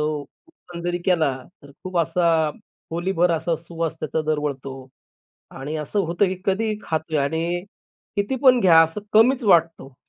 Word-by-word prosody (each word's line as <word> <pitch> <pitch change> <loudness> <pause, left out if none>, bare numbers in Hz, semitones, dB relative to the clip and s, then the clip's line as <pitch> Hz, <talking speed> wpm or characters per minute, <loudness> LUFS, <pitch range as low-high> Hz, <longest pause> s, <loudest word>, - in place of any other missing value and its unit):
open 155 - -6
जरी 175 0 -1
केला 160 -8 +2 0.3
तर 145 - -14
खूप 185 -1 -2
असा 165 -2 +2 0.4
खोलीभर 175 +1 +1
असा 165 +1 0
सुवास 165 0 -4
त्याचा 160 - -2
दरवळतो 135 -3 -4 0.6
आणि 145 +4 -6
असं 155 +6 -3
होतं 170 +4 +1
की 185 - -2
कधी 215 +3 0
खातोय 160 -1 -2
आणि 165 +5 -1 0.5
किती 205 +6 0
पण 255 -3 +6
घ्या, 170 -4 +7
असं 165 +5 -2
कमीच 245 +5 +4
वाटतो 165 -7 +2
165 Hz, 145 wpm, -22 LUFS, 155-185 Hz, 0.6 s, घ्या